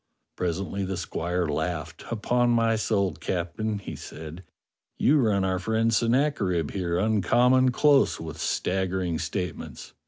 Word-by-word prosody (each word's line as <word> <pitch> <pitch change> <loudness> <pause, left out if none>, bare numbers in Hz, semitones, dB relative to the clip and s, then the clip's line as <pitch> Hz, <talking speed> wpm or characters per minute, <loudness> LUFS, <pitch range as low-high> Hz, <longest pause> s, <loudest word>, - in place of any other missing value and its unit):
Presently 95 +3 -2
the 95 -1 -3
squire 90 0 -2
laughed. 80 +1 -3
" - - -11
Upon 120 +2 +1
my 115 -1 +3
soul, 100 -3 0
Captain," 100 +5 -3
he 100 - -7
said, 80 +3 -9 0.5
"you 150 +2 +4
run 105 -6 +2
our 95 -1 0
friend 110 +3 +1
Sen 115 +2 +2
nacherib 100 - +1
here 90 -3 -1
uncommon 120 +6 +3
close 140 +2 +3
with 80 -1 -7
staggering 90 -3 -1
state 90 +1 -3
ments. - - -10
95 Hz, 145 wpm, -26 LUFS, 85-115 Hz, 0.5 s, you